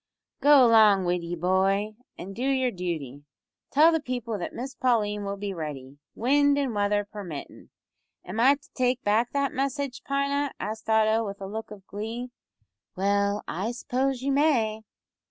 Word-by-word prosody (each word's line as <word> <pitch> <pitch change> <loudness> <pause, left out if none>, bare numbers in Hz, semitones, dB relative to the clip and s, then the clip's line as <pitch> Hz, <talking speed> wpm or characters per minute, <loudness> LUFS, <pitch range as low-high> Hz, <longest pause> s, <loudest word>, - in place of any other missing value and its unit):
"Go 285 -2 +7
along 215 -5 +5
wid 175 0 0
ye, 170 +1 -4
boy, 190 +4 +1 0.2
an' 195 +2 -8
do 230 - -7
yer 260 -1 +1
dooty. 160 - -5 0.5
Tell 310 +4 +6
the 325 - +1
people 245 -5 -4
that 175 - -4
Miss 265 +3 -6
Pauline 210 -5 0
will 200 0 -4
be 200 0 -4
ready 145 -4 -7 0.2
wind 285 +4 +3
an' 275 -4 -1
weather 205 0 +1
permittin'." 195 -8 -9 0.6
"Am 190 +5 -5
I 265 +4 +6
to 285 - -22
take 250 -1 0
back 220 +4 +2
that 280 -1 0
message, 275 -1 -2
Pina?" 280 0 -1
asked 220 +1 -5
Otto, 220 0 +3
with 200 -2 -6
a 195 - -6
look 220 +3 -6
of 200 -3 -12
glee. 225 +5 -6 0.6
"Well, 200 +2 +1
I 195 +7 -2
suppose 255 +1 -2
you 275 - 0
may." 250 -7 +2
220 Hz, 165 wpm, -26 LUFS, 200-260 Hz, 0.6 s, Go